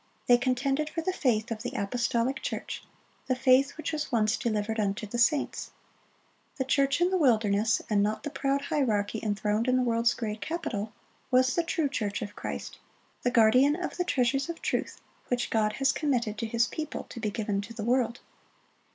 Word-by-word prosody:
They 245 -1 +5
contended 270 +4 0
for 330 - -3
the 370 +3 -1
faith 230 -7 0
of 220 -1 -3
the 245 +2 -4
apostolic 235 +4 0
church,—"the 255 - -5
faith 265 +3 +3
which 315 - -3
was 300 -1 -3
once 220 -2 +2
delivered 220 -1 -1
unto 205 0 -1
the 235 +3 -4
saints."(99) 280 +5 -3
"The 265 - 0
church 275 +3 +2
in 355 +1 +3
the 375 - +2
wilderness," 220 -5 +3
and 210 -2 +2
not 210 +1 -1
the 295 - -4
proud 275 0 0
hierarchy 220 -8 0
enthroned 210 +2 0
in 255 - +3
the 255 - +2
world's 235 0 +2
great 215 -2 -4
capital, 225 -8 -3 0.4
was 255 0 +4
the 340 - +2
true 330 -2 0
church 210 -7 -2
of 205 - -8
Christ, - - -6 0.4
the 245 - +1
guardian 250 +5 +5
of 355 +1 -4
the 360 - +1
treasures 270 -1 +1
of 340 - -5
truth - - -2 0.3
which 245 -1 -1
God 215 -1 +2
has 270 +3 +2
committed 245 -8 0
to 230 - -2
His 230 +1 +2
people 310 +4 -5
to - - -10
be 220 -2 -1
given 205 -2 -2
to 205 +3 -10
the 220 - -4
world. 240 0 +1
240 Hz, 185 wpm, -28 LUFS, 215-275 Hz, 0.4 s, They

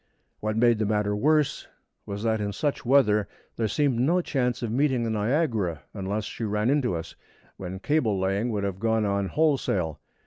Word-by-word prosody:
What 110 0 -2
made 120 -1 +4
the 110 - +1
matter 105 -1 +1
worse 150 +6 +1 0.4
was 100 +1 -5
that 110 -1 +1
in 100 -1 -2
such 145 +7 -2
weather 120 -6 +3 0.3
there 115 - 0
seemed 130 +3 +1
no 165 +9 +3
chance 125 -8 -1
of 115 - -2
meeting 130 -1 +1
the 115 - -1
Niagara 110 - 0
unless 100 +1 -3
she 115 - -6
ran 105 +3 +1
into 135 -9 +1
us, 80 - -6 0.4
when 95 0 -6
cable 115 -3 +1
laying 95 +5 0
would 105 -3 -2
have 95 -1 -3
gone 110 0 +1
on 100 -1 0
wholesale. 100 - 0
110 Hz, 180 wpm, -26 LUFS, 100-130 Hz, 0.4 s, made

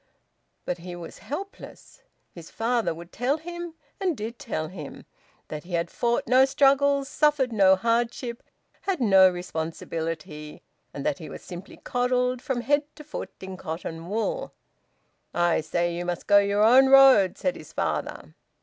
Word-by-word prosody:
But 180 - -3
he 175 +1 -8
was 170 -1 -9
helpless. 390 +8 -8 0.3
His 170 -2 -11
father 235 0 0
would 170 +2 -9
tell 260 +5 0
him, 345 +1 -7 0.2
and 365 -7 0
did 225 +3 -6
tell 155 -8 -3
him, 155 -5 -9 0.4
that 150 -1 -6
he 175 +1 -10
had 170 0 -1
fought 235 0 0
no 255 +2 +5
struggles, 280 0 +3
suffered 290 -5 +2
no 190 -3 +6
hardship, 235 +3 -1 0.4
had 385 -4 -1
no 195 -6 +6
responsibility, 165 -2 -5 0.3
and 140 - -7
that 140 - 0
he 160 - -8
was - - -9
simply 180 +2 -10
coddled 250 0 0
from 265 -4 -2
head 290 +5 +2
to 300 - -11
foot 300 - -6
in 190 -1 -7
cotton 165 0 -6
wool. 365 - -2 0.8
"I 175 -2 +2
say 170 +2 -1
you 175 - -3
must 175 -1 -4
go 205 0 +6
your 200 +1 +2
own 255 +4 +7
road," 265 -9 +7
said 275 - -1
his - - -12
father. - - -3
220 Hz, 160 wpm, -26 LUFS, 175-270 Hz, 0.8 s, own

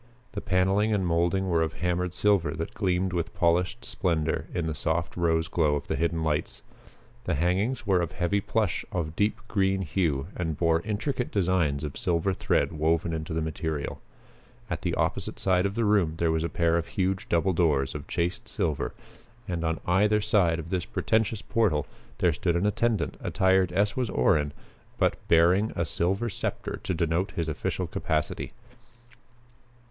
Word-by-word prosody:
The 105 -5 -5
paneling 95 +3 +2
and 95 -2 0
mouldings 85 +3 +1
were 85 -2 +2
of 80 - 0
hammered 90 0 -1
silver 95 -7 +2
that 80 +1 -4
gleamed 95 -2 0
with 85 -2 -2
polished 90 +7 +1
splendor 80 -5 -1
in 85 - -2
the 80 - -1
soft 80 +3 -1
rose 80 -2 +1
glow 75 -4 +2
of 75 - -3
the - - -2
hidden 85 -1 0
lights. 75 -2 -2 0.6
The 90 - 0
hangings 95 - 0
were 95 -3 +3
of 85 -2 -3
heavy 95 +3 0
plush 105 -4 0
of 80 -3 -3
deep 105 +3 +1
green 95 -2 +1
hue 80 -6 0
and 80 -4 -2
bore 85 -1 +2
intricate 115 +5 -2
designs 85 -7 +1
of 75 -2 -5
silver 90 +3 +1
thread - - +1
woven 80 +1 +1
into 80 0 -4
the 80 0 -1
material. 80 -1 -3 0.7
At - - -2
the - - -1
opposite - - -1
side 95 0 +2
of 100 - -6
the 115 - +1
room 100 -7 +3
there 85 -1 +2
was 80 0 0
a 85 - -1
pair 85 0 +2
of 85 - -5
huge 95 0 -1
double 85 +3 +2
doors 75 -6 +2
of 75 -2 -7
chased 90 +7 -2
silver 75 -4 -2 0.5
and 85 -2 -2
on 80 -1 0
either 105 +4 +3
side 100 -6 +2
of 85 0 -7
this 90 -2 0
pretentious 110 -1 0
portal 100 -10 +1 0.3
there 85 -3 +3
stood 85 +3 0
an 85 +3 +1
attendant 105 -2 0
attired 95 -2 +2
as 105 +3 +1
was 125 -4 -1
Orrin, 75 -1 +2 0.5
but - - +2
bearing 90 +6 +4
a 85 - 0
silver 95 +8 0
scepter 105 - -3
to 95 - -1
denote 85 +3 0
his 85 -1 -2
official 80 - -2
capacity. 75 -1 -2
85 Hz, 175 wpm, -27 LUFS, 80-95 Hz, 0.7 s, bearing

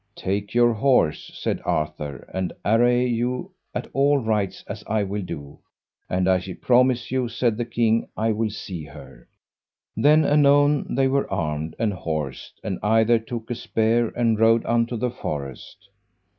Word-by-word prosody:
Take 100 +3 -3
your 120 -1 +5
horse, 110 - +2
said - - -2
Arthur, 75 -3 -3
and 95 -1 -2
array 120 +3 +3
you 125 +8 -2 0.2
at - - -3
all 140 +1 +3
rights 110 -6 -1
as 105 +1 -7
I 110 -1 +1
will 100 +1 -3
do, 75 -6 -8 0.5
and 90 0 0
I 95 -1 +2 0.2
promise 125 -1 +2
you, 130 -2 0
said 115 -1 0
the 120 +2 -2
king, 115 -1 +1
I 110 +1 +1
will 110 +1 0
see 95 -5 -7
her. 75 +1 -13 0.7
Then 150 +2 +4
anon 145 -1 +3
they 135 0 +3
were 140 +1 0
armed 80 -4 -2
and 110 -3 0
horsed, 80 -7 -5
and 95 - -3
either 115 +2 +3
took 115 +1 -7
a - - -1
spear 115 0 +1
and 115 -3 +1
rode 115 +1 +4
unto 115 0 +1
the 125 +2 -1
forest. 70 - -7
115 Hz, 155 wpm, -23 LUFS, 95-120 Hz, 0.7 s, your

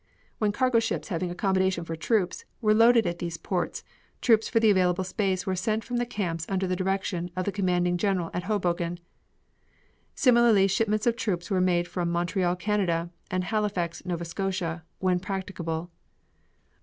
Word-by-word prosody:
When 210 -2 +2
cargo 255 +1 +2
ships 225 - -2
having 180 -1 -2
accommodations 190 -1 0
for 165 - -4
troops 180 +2 0 0.2
were 215 -2 +3
loaded 230 0 +5
at 170 0 -2
these 170 -1 -4
ports 180 0 -3 0.4
troops 225 -3 +3
for 230 - +3
the 220 -2 +5
available 185 -1 +2
space 190 0 -1
were 190 -2 0
sent 215 +4 -1
from 245 +3 -3
the 240 0 0
camps 175 -9 -3
under 190 -1 0
the 185 0 0
direction 185 -1 -1
of 185 0 -2
the 200 - 0
commanding 180 -3 +1
general 185 -3 0
at 175 0 -3
Hoboken; 175 -4 -1 1.2
similarly 235 -6 +5
shipments 215 +2 +1
of 235 -1 +3
troops 195 -6 -2
were 185 -1 +2
made 175 -1 +2
from 175 -2 -2
Montreal, 175 +1 0
Canada, 175 -3 0 0.2
and 185 0 -1
Halifax, 195 -4 -1
Nova 175 -2 -3
Scotia, 175 -2 -3
when 185 -1 +1
practicable. 180 -3 -4
185 Hz, 165 wpm, -27 LUFS, 175-210 Hz, 1.2 s, loaded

